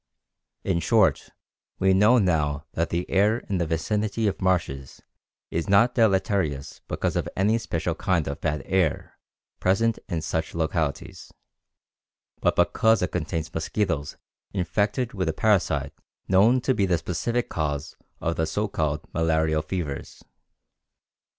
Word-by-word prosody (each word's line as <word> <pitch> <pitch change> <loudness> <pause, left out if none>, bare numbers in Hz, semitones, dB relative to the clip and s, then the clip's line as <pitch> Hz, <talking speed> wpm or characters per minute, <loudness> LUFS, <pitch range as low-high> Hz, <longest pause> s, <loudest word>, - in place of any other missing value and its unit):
In 90 -3 0
short, - - +2 0.5
we 95 0 +3
now 105 +6 +5
know 75 -8 +1
that 85 0 -1
the 85 +1 -2
air 105 +4 +3
in 95 -3 -3
the 85 - 0
vicinity 105 +7 -1
of 100 -2 -1
marshes 80 -8 -1 0.5
is 85 +2 -2
not 115 +5 +5
deleterious 95 - +1
because - - -2
of - - -1
any 105 +4 +2
special 85 -5 -2
kind 85 -2 0
of 70 0 -5
bad 75 -3 -1
air 95 -5 -1 0.4
present 110 +5 +2
in 85 -4 -2
such 80 +1 -3
localities, 80 -2 -2 1.1
but - - +1
because 110 -3 +3
it 90 - -1
contains 80 -1 -3
mosquitoes 80 -3 -2 0.4
infected 100 +6 -1
with 90 -5 -1
a - - -1
parasite 80 -10 +1 0.3
known 110 +7 +4
to 130 - +1
be 100 -5 +1
the 90 -2 +2
specific 115 +9 -2
cause 75 -1 -3 0.2
of 80 0 -2
the 80 - 0
so 105 +6 -1
called 75 -6 -1
malarial 80 -1 +1
fevers. 75 -3 -5
90 Hz, 135 wpm, -25 LUFS, 80-100 Hz, 1.1 s, now